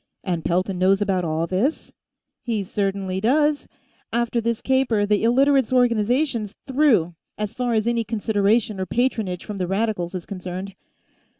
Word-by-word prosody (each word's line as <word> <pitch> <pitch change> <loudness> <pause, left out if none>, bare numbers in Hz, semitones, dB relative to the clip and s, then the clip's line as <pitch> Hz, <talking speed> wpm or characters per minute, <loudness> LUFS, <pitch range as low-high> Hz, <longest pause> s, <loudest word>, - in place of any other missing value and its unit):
"And 175 -4 -2
Pelton 185 +2 0
knows 190 +1 +4
about 195 -3 0
all 160 0 -1
this?" 200 - -1 0.5
"He 225 -4 -2
certainly 195 -1 -2
does! 295 +6 +2 0.4
After 235 0 0
this 230 0 -1
caper, 260 -6 +1
the 205 0 +1
Illiterates' 265 +2 +3
Organization's 240 -1 +1
through, 260 - +2 0.2
as 210 -1 -3
far 245 -2 -1
as 215 0 +1
any 235 -1 +1
consideration 210 -1 0
or 185 - -2
patronage 220 -6 -1
from 210 -2 -6
the 180 -2 -2
Radicals 195 -3 -1
is 180 - -5
concerned." 185 0 -6
210 Hz, 145 wpm, -23 LUFS, 190-240 Hz, 0.5 s, knows